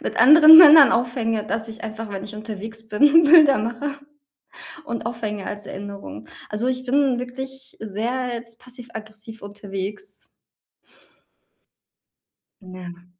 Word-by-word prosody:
mit - - -6
anderen 310 +5 +8
Männern 305 -4 +8
aufhänge, 230 -2 -2
dass 225 0 -4
ich 220 0 -10
einfach, 220 -1 -8
wenn 195 -1 -7
ich 210 - -10
unterwegs 220 +1 -10
bin, 295 +9 +4
Bilder 300 -4 +5
mache 235 +6 -5 1.0
und 235 -5 -7
aufhänge 215 -4 -6
als 205 0 -7
Erinnerung. 190 - -10 0.2
Also, 215 +4 -4
ich 255 0 -3
bin 270 -1 0
wirklich 265 +1 -10
sehr 230 +5 -5
jetzt 230 0 -9
passiv-aggressiv 225 -3 -12
unterwegs. 200 - -8 2.5
Ja. 180 -2 -13
225 Hz, 120 wpm, -20 LUFS, 210-255 Hz, 2.5 s, anderen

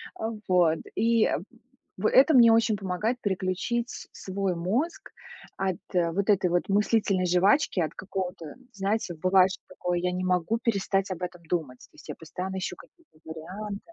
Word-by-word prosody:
А, 220 - -3 0.2
вот. 175 -3 +3 0.2
И, 230 -1 +3
э, - - +1 0.6
в 215 +3 +1
это 275 +4 +6
мне 235 -3 +8
очень 225 -1 +3
помогает 210 +6 -2
переключить 200 +5 -1
с - - -8
свой 190 -1 -3
мозг 230 - -2 0.5
от 190 -2 -1 0.2
вот 180 +4 0
этой 190 -3 +3
вот 175 0 0
мыслительной 200 -2 +2
жвачки, 185 - +3
от 160 - -1
какого-то, 180 -5 -5 0.2
знаете, 200 -1 -1
бывает, 185 +3 +4
что - - -8
такое: 180 -1 -2
"Я 180 0 0
не 180 0 -3
могу 185 +4 +1
перестать 195 -4 0
об 180 -1 -5
этом 175 -1 -6
думать", 155 -7 -3
то - - -18
есть - - -15
я - - -4
постоянно 185 +4 -6
ищу 185 - -3
какие-то 340 - -20
варианты. 190 +6 -6
190 Hz, 170 wpm, -27 LUFS, 180-215 Hz, 0.6 s, мне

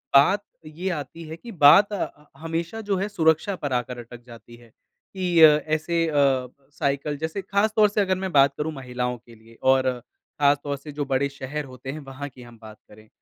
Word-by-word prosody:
बात 195 +9 +5 0.2
ये 170 +5 -5
आती 165 +1 -6
है 160 - -7
कि 235 +4 -11
बात 190 +6 +6
ह 150 -6 -5
हमेशा 165 +7 -4
जो 205 -2 -1
है 195 +2 -1
सुरक्षा 165 +1 +1
पर 145 -6 -4
आकर 125 0 -2
अटक 120 0 -11
जाती 120 -1 -14
है 120 -1 -18
कि 180 - -4
अ, 160 - +12
ऐसे 155 +2 +1
अ, 140 -4 +2 0.2
साइकिल 140 +1 -2
जैसे 160 +6 -4
खास 200 +3 +1
तौर 210 -1 +5
से 210 0 0
अगर 190 -1 +1
मैं 190 -1 -4
बात 140 -1 +5
करूँ 155 +1 -2
महिलाओं 125 -2 -4
के 115 0 -18
लिए 115 +1 -19
और 130 0 +3 0.5
खास 145 0 +4
तौर 140 -1 -3
से 150 +2 -10
जो 145 0 -3
बड़े 135 +1 0
शहर 140 +2 -6
होते 130 0 -8
हैं, 155 - -7
वहाँ 140 0 -8
की 125 - -16
हम 120 -1 -14
बात 110 -1 -12
करें, 110 +1 -17
145 Hz, 210 wpm, -24 LUFS, 130-170 Hz, 0.5 s, अ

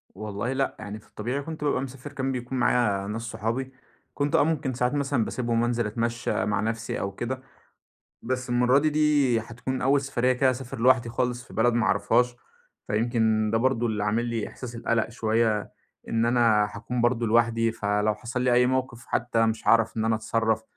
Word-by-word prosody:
والله 105 +4 -3
لأ. 135 0 -1
يعني 105 0 -7
في - - -22
الطبيعي 125 +6 -3
كنت 155 +1 -7
بابقى 145 -3 +1
مسافر 135 +2 -8
كان 135 -1 -2
بيكون 125 0 -4
معايا 110 -5 +2
ناس 110 +2 -4
صحابي. 115 +3 -3 0.4
كنت 145 0 0
آه - - +5
ممكن 145 -4 -1
ساعات 125 +2 0
مثلًا 140 -5 0
باسيبهم 115 -1 -1
وأنزل 120 -1 0
أتمشّى 115 -2 -1
مع 105 -1 0
نفسي 110 +1 -2
أو 100 - -2
كده. 120 +6 -4 0.8
بس 130 +1 -3
المرّة 125 +2 +4
دي، 155 +2 +2
دي 145 -6 +3
هتكون 125 +4 -5
أول 140 +2 +3
سفرية 130 -2 +1
كده 130 +1 +3
أسافر 125 -2 -6
لوحدي 125 0 +4
خالص 125 +1 -2
في - - -16
بلد 120 +2 +3
ما 115 -3 +1
أعرفهاش. 120 +4 +2 0.5
فيمكن 110 -1 +1
ده 115 - +2
برضه 120 -1 +1
اللي 105 -2 -1
عامل 110 +3 +1
لي 115 -2 -2
إحساس 120 -2 -9
القَلَق 115 -1 0
شوية 110 -2 0 0.4
إن 115 0 +1
أنا 115 -3 +3
هاكون 115 +4 -3
برضه 120 0 +2
لوحدي 115 0 +2
فلو 105 0 0
حصل 125 +3 -4
لي 125 -1 +2
أي 125 +1 +5
موقف 130 -2 -2
حتّى 115 -1 +1
مش 110 0 -2
هاعرف 115 -1 +4
إن 110 - 0
أنا 110 0 +2
أتصرّف، 110 0 0
120 Hz, 190 wpm, -26 LUFS, 110-130 Hz, 0.8 s, آه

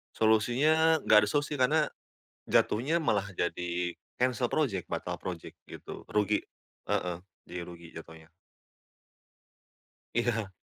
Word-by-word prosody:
Solusinya 140 +9 +4
nggak 110 - +7
ada - - -3
solusi 145 +4 0
karena, 150 +4 +3 0.6
jatuhnya 145 +10 +2
malah 100 -8 +1
jadi 90 -1 -2 0.2
cancel 125 -1 +1
project, 110 - 0
batal - - -3
project - - -6
gitu - - -9
rugi, 105 0 +1 0.4
heeh, 90 -1 -1 0.3
jadi 90 - -6
rugi 85 -1 -11
jatuhnya. 80 0 -11 1.8
Iya. 115 -4 0
110 Hz, 105 wpm, -30 LUFS, 90-135 Hz, 1.8 s, nggak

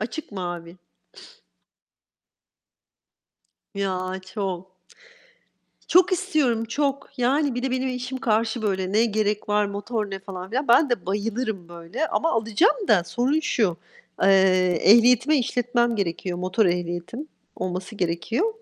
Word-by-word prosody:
Açık 240 +5 -6
mavi. 175 -2 -6 3.0
Ya, 190 -1 -2
çok. 185 -2 -5 1.2
Çok 360 +1 +5
istiyorum, 305 - +1
çok. 275 +4 -2
Yani 270 +2 +1
bir 245 - -3
de 265 - -1
benim 260 +1 -1
eşim 250 +1 -4
karşı 225 -1 0
böyle; 190 -3 -1
"Ne 220 +2 +4
gerek 210 -2 -1
var, 210 0 +2
motor 205 +1 -4
ne?" 195 - -4
falan 190 -1 -8
filan. 265 +4 -2
Ben 255 +4 +5
de 235 -8 -1
bayılırım 210 -1 -2
böyle. 170 - -4
Ama 330 +1 0
alacağım 230 - +1
da 180 -5 +4
sorun 255 - 0
şu: 210 - 0 0.5
Eee, 195 - +5 0.5
ehliyetime 245 +6 +6
işletmem 240 -1 0
gerekiyor, 180 -2 -2
motor 185 +4 +1
ehliyetim 175 - -3 0.3
olması 185 +3 -4
gerekiyor. 205 - -1
220 Hz, 120 wpm, -24 LUFS, 185-250 Hz, 3.0 s, ehliyetime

